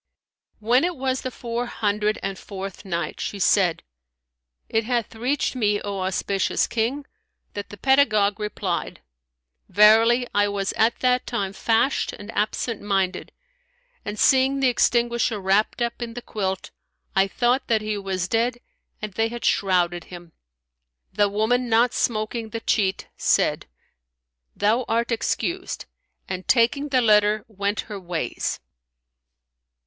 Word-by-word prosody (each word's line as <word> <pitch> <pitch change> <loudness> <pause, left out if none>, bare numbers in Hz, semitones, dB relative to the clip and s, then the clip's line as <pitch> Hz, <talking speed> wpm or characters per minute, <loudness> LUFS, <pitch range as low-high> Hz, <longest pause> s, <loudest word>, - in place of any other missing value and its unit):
When 240 +6 +2
it 355 0 0
was 260 -1 -1
the 255 - -3
Four 240 0 -4
Hundred 210 -1 0
and 195 0 -2
Fourth 195 0 -8
Night, 170 -4 -3
She 205 - -4
said, 190 -2 +2 0.8
It 225 0 0
hath 240 -1 -1
reached 255 +5 -1
me, 210 -4 +1
O 200 -1 -4
auspicious 190 +1 0
King, 245 +6 -2 0.5
that 205 0 -6
the 205 - -10
pedagogue 215 -5 +3
replied, 205 -4 -3 0.7
"Verily 225 +4 +5
I 205 0 +3
was 200 -1 -2
at 225 +2 +2
that 250 0 +2
time 200 -5 -2
fashed 225 +6 +1
and 205 +2 -9
absent 215 +1 -2
minded 195 -2 -1 0.7
and, 205 +1 -5
seeing 265 +3 +4
the 265 -1 +4
extinguisher 235 -2 +1
wrapped 200 +5 +1
up 235 +1 -3
in 230 -1 -5
the 245 - -6
quilt, 190 -3 -3 0.4
I 195 0 +4
thought 245 +5 +1
that 220 -2 +2
he 215 0 -2
was 190 -3 -2
dead 235 +4 0 0.5
and 210 -2 -4
they 225 +3 +1
had 235 +1 -6
shrouded 175 -3 +1
him." 175 -2 -11 0.8
The 205 +1 +2
woman, 230 +4 +1
not 230 +2 +3
smoking 220 0 -1
the 225 +1 -5
cheat, 195 -4 0
said, - - +1 0.9
"Thou 220 +5 +2
art 230 +2 0
excused," 345 +10 -2 0.4
and 185 0 -5
taking 265 +4 +3
the 260 -2 +3
letter, 210 -1 +3
went 200 -1 -2
her 210 -3 -8
ways. 170 -8 -3
215 Hz, 140 wpm, -23 LUFS, 200-240 Hz, 0.9 s, Verily